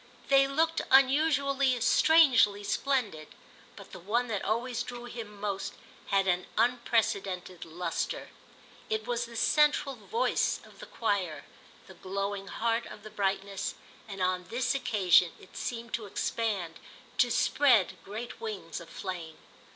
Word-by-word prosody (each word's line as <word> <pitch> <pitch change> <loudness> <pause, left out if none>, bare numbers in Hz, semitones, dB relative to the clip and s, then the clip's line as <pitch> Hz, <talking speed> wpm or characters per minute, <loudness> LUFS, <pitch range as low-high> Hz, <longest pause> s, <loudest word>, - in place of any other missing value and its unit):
They 275 0 +6
looked 320 +4 +1
unusually, 275 -1 +4
strangely 250 -7 +5
splendid, 210 - -1 0.5
but - - -13
the - - -9
one 230 +7 -1
that 205 -3 -2
always 235 +2 -1
drew 240 0 -7
him 225 -4 -8
most 200 -1 -3 0.3
had 195 -1 +2
an 180 0 +1
unprecedented 210 -6 0
lustre. 165 0 -3 0.6
It 220 0 -1
was 240 0 -1
the 235 - -12
central 295 +2 +3
voice 445 - 0
of - - -18
the - - -9
choir, 195 -8 -2 0.4
the - - -13
glowing 195 +1 -4
heart 230 +2 -1
of 210 - -11
the 215 - -10
brightness, 195 -1 -2 0.3
and 195 -3 -4
on 180 0 0
this 240 +4 -1
occasion 200 -10 +3
it - - -17
seemed 235 -1 -5
to 220 -3 -3
expand, 195 -5 -2 0.4
to 245 - +5
spread 230 -7 +3
great 220 +5 -7
wings 205 -7 -5
of 170 - -12
flame. 175 -4 -6
220 Hz, 135 wpm, -29 LUFS, 195-250 Hz, 0.6 s, They